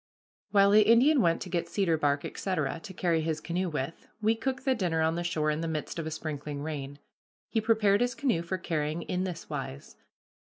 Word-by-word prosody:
While 200 -1 +5
the 215 +1 +7
Indian 240 +7 +5
went 165 -4 +2
to 185 - -9
get 170 -1 -2
cedar 170 -2 +1
bark, 145 -2 +1
etc., 165 -5 -2
to 200 - -9
carry 170 -3 +1
his 155 -1 -1
canoe 180 +3 -2
with, 150 0 -4
we 220 +1 +3
cooked 265 +3 -3
the 265 - +4
dinner 175 -8 0
on 160 0 +2
the 170 +1 -2
shore 155 -3 0
in 150 +1 -2
the 165 - -2
midst 160 +1 -3
of 160 - -3
a - - -1
sprinkling 150 -2 -5
rain. 145 -2 -5 0.5
He 225 - +1
prepared 215 -2 +3
his 245 0 +1
canoe 255 - +1
for 170 +2 -3
carrying 160 -1 -2
in 185 +1 -2
this 180 -3 -6
wise. 70 +1 -6
170 Hz, 210 wpm, -29 LUFS, 155-205 Hz, 0.5 s, the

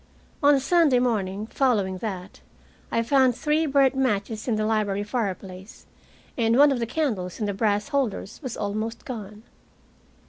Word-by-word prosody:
On 290 0 +6
the - - +2
Sunday 305 -2 +3
morning 210 -5 -1
following 210 -7 0
that 190 -4 -6 0.5
I 230 - +1
found 260 0 +3
three 310 +4 +1
burnt 275 -1 +3
matches 220 -4 -1
in 235 - +1
the 215 0 0
library 210 -2 0
fireplace, 195 -3 -5 0.5
and 230 0 +2
one 290 +1 +7
of 265 - 0
the 230 - -2
candles 225 - -2
in 215 - -1
the 205 - -1
brass 205 +3 0
holders 265 -8 -2
was 255 -5 -5
almost 215 +3 -4
gone. 215 -3 -8
225 Hz, 160 wpm, -25 LUFS, 205-265 Hz, 0.5 s, one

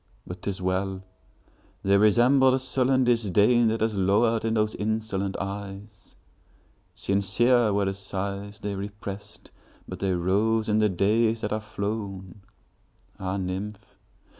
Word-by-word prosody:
But 90 +1 -8
't - - -3
is 95 -1 -3
well!—they 95 +1 -4
resemble 120 +6 +5
the 130 - +3
sullen 130 0 +1
disdainThat 115 0 +3
has 110 -1 +1
lowered 110 +4 +2
in 115 0 0
those 110 0 +1
insolent 105 -2 -2
eyes. 100 +1 -7 0.8
Sincere 115 +4 +2
were 100 0 +1
the 95 - -1
sighs 100 +1 -5
they 105 -1 -4
represt, 100 0 -8 0.4
But - - -7
they 95 -1 0
rose 105 +5 +1
in 105 0 +2
the 105 -1 +3
days 110 +5 +1
that 105 - -2
are 110 - -1
flown! 100 -3 -5 0.8
Ah, 95 +1 -2
nymph! 100 +3 -5
105 Hz, 130 wpm, -26 LUFS, 95-110 Hz, 0.8 s, resemble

